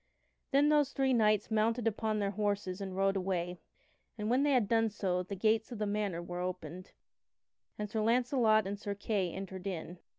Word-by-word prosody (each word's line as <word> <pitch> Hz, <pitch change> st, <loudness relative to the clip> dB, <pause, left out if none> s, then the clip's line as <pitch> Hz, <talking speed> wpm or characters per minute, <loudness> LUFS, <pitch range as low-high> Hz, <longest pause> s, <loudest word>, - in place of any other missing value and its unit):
Then 285 Hz, +2 st, +4 dB
those 295 Hz, -2 st, +3 dB
three 265 Hz, -1 st, +2 dB
knights 215 Hz, -2 st, +2 dB
mounted 225 Hz, +2 st, +1 dB
upon 220 Hz, 0 st, 0 dB
their 200 Hz, -1 st, 0 dB
horses 200 Hz, -2 st, -2 dB
and 190 Hz, -1 st, -5 dB
rode 195 Hz, 0 st, +2 dB
away, 180 Hz, -2 st, -2 dB, 0.6 s
and 210 Hz, +1 st, -2 dB
when 255 Hz, +2 st, +3 dB
they 290 Hz, 0 st, +3 dB
had 240 Hz, -6 st, +3 dB
done 225 Hz, 0 st, +3 dB
so 185 Hz, -3 st, -1 dB
the 185 Hz, +2 st, -6 dB
gates 220 Hz, +4 st, +1 dB
of 240 Hz, -, -5 dB
the 210 Hz, -, -1 dB
manor 205 Hz, -4 st, -2 dB
were 175 Hz, +1 st, -5 dB
opened, 185 Hz, 0 st, -5 dB, 0.9 s
and 210 Hz, -, -3 dB
Sir 215 Hz, +1 st, -2 dB
Launcelot 230 Hz, -2 st, +3 dB
and 200 Hz, +1 st, -4 dB
Sir 205 Hz, -1 st, -4 dB
Kay 200 Hz, -3 st, -1 dB
entered 190 Hz, 0 st, -6 dB
in. 175 Hz, -1 st, -5 dB
210 Hz, 190 wpm, -32 LUFS, 190-225 Hz, 0.9 s, Then